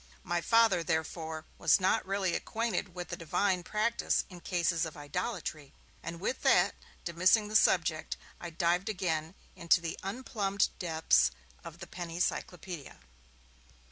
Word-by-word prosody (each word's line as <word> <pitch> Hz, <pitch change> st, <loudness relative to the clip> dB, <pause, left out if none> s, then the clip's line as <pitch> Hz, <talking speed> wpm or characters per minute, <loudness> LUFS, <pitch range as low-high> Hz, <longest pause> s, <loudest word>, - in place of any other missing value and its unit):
My 175 Hz, 0 st, -1 dB
Father, 225 Hz, -3 st, +4 dB
therefore, 160 Hz, -1 st, -2 dB
was -, -, +5 dB
not 190 Hz, 0 st, +2 dB
really 195 Hz, -2 st, 0 dB
acquainted 225 Hz, -5 st, -2 dB
with 180 Hz, -1 st, -5 dB
the 175 Hz, -, -3 dB
Divine 180 Hz, +3 st, 0 dB
practice 215 Hz, +6 st, 0 dB
in 180 Hz, -, -9 dB
cases 170 Hz, -2 st, 0 dB
of 160 Hz, -2 st, -4 dB
idolatry. 155 Hz, -, -4 dB, 0.3 s
And 170 Hz, +1 st, -6 dB
with 250 Hz, +8 st, -2 dB
that, -, -, +4 dB, 0.3 s
dismissing 185 Hz, +5 st, +3 dB
the 215 Hz, -, -5 dB
subject, 165 Hz, -6 st, +3 dB, 0.2 s
I 175 Hz, -, -6 dB
dived 175 Hz, +4 st, +1 dB
again 165 Hz, -4 st, -2 dB, 0.2 s
into 170 Hz, +1 st, +4 dB
the 165 Hz, -1 st, -5 dB
unplumbed 200 Hz, -2 st, -1 dB
depths 160 Hz, -, +3 dB, 0.3 s
of -, -, -9 dB
the -, -, -8 dB
Penny 170 Hz, -1 st, -6 dB
Cyclopaedia. 180 Hz, -3 st, -3 dB
175 Hz, 140 wpm, -31 LUFS, 165-195 Hz, 0.3 s, was